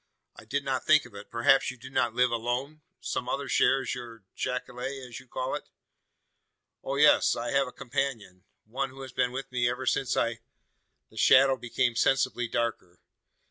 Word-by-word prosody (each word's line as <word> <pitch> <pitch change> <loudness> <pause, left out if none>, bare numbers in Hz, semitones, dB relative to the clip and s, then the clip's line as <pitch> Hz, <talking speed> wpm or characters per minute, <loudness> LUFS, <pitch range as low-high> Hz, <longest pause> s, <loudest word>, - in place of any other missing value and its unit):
"I - - -13
did 140 +5 -2
not 130 -1 -1
think 155 -3 +5
of 125 - -14
it! 100 +1 -10
Perhaps 120 +3 +3
you 130 - -7
do 130 +2 -11
not 120 -3 0
live 125 0 +3
alone? 120 +6 -2 0.2
Some 125 - -3
other 140 +1 -2
shares 135 0 +2
your 115 -3 -9
jacale 125 -1 -4 0.3
as 120 0 -8
you 130 - -17
call 130 +2 -3
it?" - - -5 1.1
"Oh, 135 - -3
yes, 150 +2 +5
I 120 - -3
have 140 -1 +2
a - - -8
companion 125 -9 -4 0.2
one 130 +5 -3
who 135 +1 -10
has 130 - -8
been 125 0 0
with 135 +1 -6
me 120 -1 +1
ever 125 +2 -4
since 130 -1 0
I 115 -1 0 0.3
" - - -49
The - - -17
shadow 135 0 +6
became 120 -1 -1
sensibly 130 -1 +1
darker. 110 -7 -3
125 Hz, 185 wpm, -28 LUFS, 120-135 Hz, 1.1 s, shadow